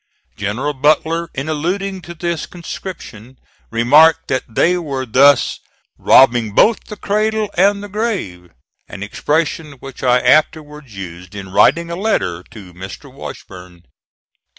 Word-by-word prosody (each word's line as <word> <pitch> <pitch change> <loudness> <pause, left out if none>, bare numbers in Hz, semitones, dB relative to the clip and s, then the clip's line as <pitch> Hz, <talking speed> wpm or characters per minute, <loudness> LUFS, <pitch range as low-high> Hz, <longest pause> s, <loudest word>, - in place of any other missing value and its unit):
General 120 +9 -3
Butler, 160 +4 +1
in 135 +3 -4
alluding 185 +5 -2
to 170 0 -10
this 170 0 -3
conscription, 135 - -9 0.3
remarked 150 +8 +4
that 130 - 0
they 170 +10 +2
were 140 -7 -4
thus 140 +4 +4 0.4
"robbing 120 -5 +4
both 225 - +3
the 210 - -8
cradle 215 +1 -1
and 200 +2 +2
the - - -6
grave," 195 - -4 0.4
an 100 - -7
expression 150 +7 -2
which 135 -1 -11
I 125 -1 +3
afterwards 150 -2 0
used 90 0 -9
in 95 -2 -8
writing 170 - +3
a - - -3
letter 170 - -1
to 95 -5 -13
Mr. 95 +1 -10
Washburn. 90 -1 -11
145 Hz, 130 wpm, -17 LUFS, 110-170 Hz, 0.4 s, remarked